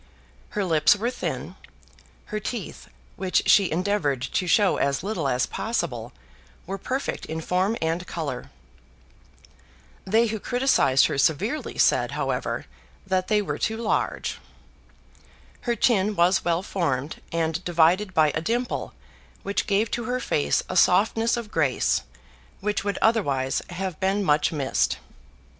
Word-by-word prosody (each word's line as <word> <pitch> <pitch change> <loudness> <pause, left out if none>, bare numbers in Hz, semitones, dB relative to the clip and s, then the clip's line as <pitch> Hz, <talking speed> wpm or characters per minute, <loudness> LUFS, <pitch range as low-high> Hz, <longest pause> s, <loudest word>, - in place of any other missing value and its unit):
Her 205 - +1
lips 160 0 +4
were 230 +4 -1
thin. - - -4 0.8
Her 215 - 0
teeth, 215 0 -6 0.3
which 185 -1 +1
she 195 -3 +5
endeavoured 165 -7 0
to 180 - 0
show 200 +3 +4
as 140 +2 0
little 205 -7 -2
as 125 -1 +1
possible, 230 +2 -3 0.5
were 195 0 -5
perfect 265 +7 -3
in 160 +1 -4
form 185 +7 0
and 165 +2 -1
colour. 145 -7 -4 1.5
They 220 +5 +3
who 220 -1 -2
criticised 245 - +3
her 140 - -1
severely 195 - 0
said, - - +3
however, - - -2 0.4
that 185 -1 0
they 210 -1 +2
were - - -4
too 220 0 -1
large. 225 -1 -1 1.3
Her 235 - +2
chin 210 -3 +2
was 175 +2 +3
well 170 +1 0
formed, 150 -8 -2
and 165 +1 -1
divided 175 +3 +2
by 155 -2 +4
a - - -2
dimple 240 +7 -2 0.5
which 200 +4 -1
gave 210 +1 +1
to 240 - -2
her 250 +2 -1
face 70 - +1
a - - -5
softness 225 +5 +3
of 225 -3 -6
grace 135 -4 +1 0.6
which 210 0 -1
would 205 0 -2
otherwise 140 - +1
have 180 -1 -4
been 195 +2 +1
much 150 -3 +2
missed. 140 -4 0
190 Hz, 140 wpm, -25 LUFS, 160-215 Hz, 1.5 s, she